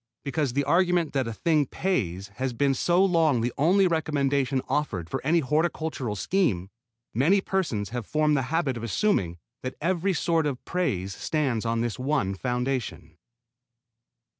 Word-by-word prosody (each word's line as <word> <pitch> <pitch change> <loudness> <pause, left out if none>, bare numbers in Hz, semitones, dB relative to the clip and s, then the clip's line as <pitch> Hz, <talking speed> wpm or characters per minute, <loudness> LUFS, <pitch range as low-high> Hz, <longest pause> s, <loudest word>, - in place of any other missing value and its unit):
Because 140 -2 -1
the 140 +2 +1
argument 175 +2 +2
that 135 -4 0
a - - -3
thing 155 +1 +1
pays 100 - -2
has 130 -1 0
been 135 +3 +2
so 175 +8 +3
long 160 -9 +3
the 120 +1 -1
only 185 +7 +4
recommendation 140 -5 0
offered 105 - -1
for - - -2
any 165 +4 +3
horticultural 155 -5 -1
scheme, 100 - 0 0.4
many 160 - +3
persons 165 - -1
have 120 -3 -5
formed 150 -1 +2
the 135 - +2
habit 150 -6 0
of 115 - -7
assuming 100 - 0 0.2
that 130 0 -5
every 185 +3 0
sort 165 -2 +1
of 135 -4 -4
praise 100 - -1
stands 130 -8 -1
on 115 0 0
this 120 +1 -3
one 130 -8 0
foundation. 125 -7 -3
140 Hz, 155 wpm, -26 LUFS, 120-165 Hz, 0.4 s, only